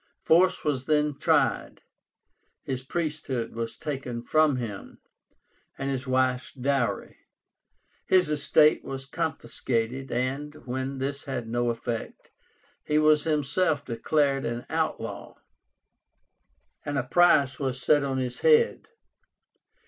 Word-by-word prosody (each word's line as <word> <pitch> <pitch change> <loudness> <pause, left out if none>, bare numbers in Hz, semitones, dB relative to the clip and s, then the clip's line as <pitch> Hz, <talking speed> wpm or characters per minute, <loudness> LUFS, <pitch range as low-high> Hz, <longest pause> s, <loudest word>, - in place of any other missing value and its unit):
Force 180 +3 +4
was 135 -4 -1
then 150 0 +2
tried. - - +1 0.8
His 130 -1 -3
priesthood 140 -5 -3
was 115 0 -5
taken 130 -5 -5
from 155 +2 +3
him, 115 -5 -6 0.8
and 135 0 -2
his 130 0 -4
wife's 130 -1 +1
dowry. 135 -1 -1 0.9
His 185 -3 +4
estate 150 +1 +3
was 135 0 -6
confiscated, 130 -4 -3
and, 135 +5 -2
when 130 +2 -3
this 140 +2 -3
had 130 -5 -4
no 120 +1 0
effect, 115 0 -5 0.5
he 150 - 0
was 155 0 +4
himself 150 0 0
declared 135 +3 0
an 120 +1 -4
outlaw, - - -3 1.5
and 145 -1 -3
a 135 - +1
price 140 -1 +3
was 130 -2 -2
set 145 +3 +3
on 135 -1 -1
his 125 -2 -3
head. 470 -1 +3
135 Hz, 115 wpm, -27 LUFS, 125-150 Hz, 1.5 s, Force